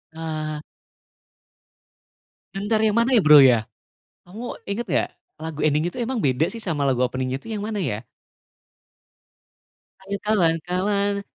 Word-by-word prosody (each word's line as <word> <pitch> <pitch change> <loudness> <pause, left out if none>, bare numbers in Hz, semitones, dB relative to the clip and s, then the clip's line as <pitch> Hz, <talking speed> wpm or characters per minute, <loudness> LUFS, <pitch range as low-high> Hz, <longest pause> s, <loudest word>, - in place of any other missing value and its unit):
Ah. 155 -2 -4 1.9
Bentar 205 +3 0
yang 215 - +2
mana 235 +2 +3
ya, - - +5
Bro, 150 -2 +9
ya? 120 -4 +5 0.6
Kamu 220 +7 -7
inget 210 +4 -3
gak 130 - +1 0.3
lagu 155 -1 -6
ending 155 +3 +1
itu - - -10
emang 245 +2 -2
beda 145 - +1
sih 230 - -6
sama 170 -10 -2
lagu 125 -1 +2
opening-nya 130 +1 -2
itu - - -20
yang 210 - -3
mana 215 0 -3
ya? 110 - -2 2.0
Ayo 200 +1 -4
kawan-kawan. 200 +2 +1
175 Hz, 130 wpm, -23 LUFS, 150-210 Hz, 2.0 s, Bro